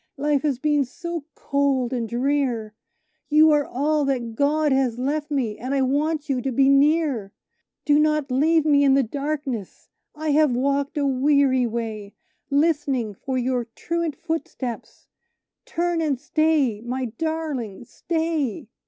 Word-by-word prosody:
Life 290 0 +1
has 285 -4 0
been 295 +1 +2
so 335 +4 -6
cold 275 -3 0
and 235 -3 -2
drear, 245 -4 -1 0.6
You 310 +1 +6
are 295 -1 +2
all 295 +4 0
that 245 -4 -2
God 295 +4 +1
has 265 -3 +1
left 295 +4 -2
me, 245 -8 -2
and 260 +3 -2
I 270 - +2
want 295 +3 0
you 265 -3 0
to 270 - -2
be 270 +2 +3
near! 275 -7 +2 0.5
Do 295 0 +4
not 305 -3 +1
leave 310 +4 +3
me 285 -2 +4
in 270 -1 +5
the 275 - +4
darkness! 275 - -4 0.3
I 310 0 -2
have 295 -3 +3
walked 280 +3 0
a 285 - +1
weary 270 -1 +3
way, 220 -3 -5 0.3
Listening 280 -6 +1
for 260 +6 -4
your 250 -1 0
truant 335 -3 -2
footsteps 320 -7 -5 0.6
turn 345 0 -1
and 290 -5 0
stay, 295 -7 +1
my 250 +2 -3
darling, 260 -4 -4
stay!" 320 - -2
280 Hz, 145 wpm, -23 LUFS, 250-305 Hz, 0.6 s, You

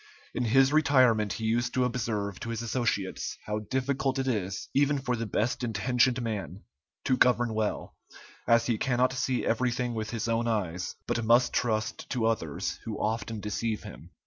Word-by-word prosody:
In 125 - -1
his 135 +4 +4
retirement 130 -9 +4
he 110 - -4
used 120 +2 0
to 130 -1 +3
observe 110 -6 -2
to 115 - -5
his 115 0 -3
associates 115 -5 -2
how 105 0 -2
difficult 130 +4 -1
it 135 0 -1
is, 100 -6 -2
even 145 +1 +3
for 125 -2 -1
the 115 -1 -3
best 110 +5 -1
intentioned 120 +3 +2
man, 100 -5 -4 0.4
to 130 - +3
govern 120 -2 +3
well, 110 -1 -2 0.5
as 115 0 +4
he 115 -3 0
cannot 125 0 +2
see 130 -1 -1
everything 120 +1 0
with 110 -1 -3
his 115 0 -3
own 115 +1 0
eyes, 95 -6 -2
but 120 - -1
must 120 +3 +4
trust 110 -2 -1
to 120 -4 0
others, 105 -10 -1
who 110 -2 -5
often 110 0 -2
deceive 105 +1 -2
him. - - -11
115 Hz, 170 wpm, -28 LUFS, 110-125 Hz, 0.5 s, his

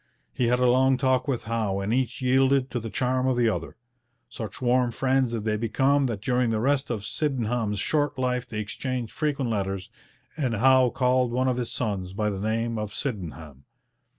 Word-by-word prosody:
He 125 - 0
had 125 +1 +3
a 125 - +3
long 130 +1 +4
talk 130 0 +1
with 130 -4 -1
Howe 110 -4 -1
and 100 +3 -1
each 130 0 -1
yielded 135 +1 +3
to 120 - -1
the 115 0 -6
charm 130 +4 0
of 130 -2 +1
the 120 -1 +3
other. 110 - -3 0.5
Such 110 -4 -7
warm 125 0 +2
friends 130 +1 +1
did 115 -3 -3
they 105 -1 0
become 135 +5 +2
that 105 -4 -4
during 125 -1 +1
the 110 -1 0
rest 135 +3 +1
of 110 -4 -3
Sydenham's 120 -7 -1
short 145 +6 0
life 125 -1 -1
they 110 - -5
exchanged 120 +2 -4
frequent 145 -5 -1
letters, 95 -1 -3 0.4
and 130 -7 -1
Howe 130 +2 +5
called 125 0 +1
one 130 +2 +1
of 125 -1 +1
his 125 -2 -2
sons 100 -6 -2
by 105 +1 0
the 95 - -4
name 115 +2 -1
of 105 -1 -4
Sydenham. 80 - -6
120 Hz, 195 wpm, -26 LUFS, 110-130 Hz, 0.5 s, Howe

